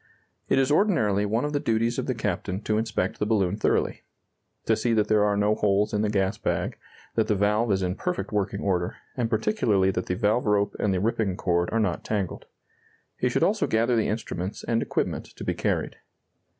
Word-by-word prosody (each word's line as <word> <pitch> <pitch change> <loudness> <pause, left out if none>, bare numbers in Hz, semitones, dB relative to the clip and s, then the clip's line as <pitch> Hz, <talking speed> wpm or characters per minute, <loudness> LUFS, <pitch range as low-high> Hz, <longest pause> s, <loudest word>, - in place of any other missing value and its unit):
It - - +3
is 135 +1 +3
ordinarily 110 - +2
one 115 +6 0
of 150 - -3
the 145 - +1
duties 115 -1 0
of - - -3
the - - 0
captain 95 +1 -2
to 110 0 0
inspect 110 -4 -2
the - - +1
balloon 100 -4 +1
thoroughly; 110 - 0 0.6
to - - +3
see 120 - 0
that 105 -1 +1
there 105 -1 +4
are 105 -1 +2
no 105 +1 +3
holes 105 0 +1
in 105 - +1
the 105 - +1
gas 95 -2 0
bag, - - -2 0.3
that 110 - +1
the 105 - +2
valve 105 +3 +2
is 95 -1 +1
in 90 0 0
perfect 180 - -3
working 100 -1 -1
order, 90 -3 0 0.2
and 120 -3 -1
particularly 110 - +2
that 90 - -3
the 90 - -1
valve 110 +3 +1
rope 100 -1 +2
and 105 - +1
the 95 - +1
ripping 105 -2 0
cord 85 -1 +1
are 115 - +1
not 95 -6 0
tangled. 100 -5 -3 0.7
He - - +2
should - - +1
also - - +2
gather 115 +2 +2
the 110 - +2
instruments 100 -3 -4
and 115 -1 0
equipment - - -2
to - - -8
be - - 0
carried. - - -1
105 Hz, 210 wpm, -26 LUFS, 100-115 Hz, 0.7 s, there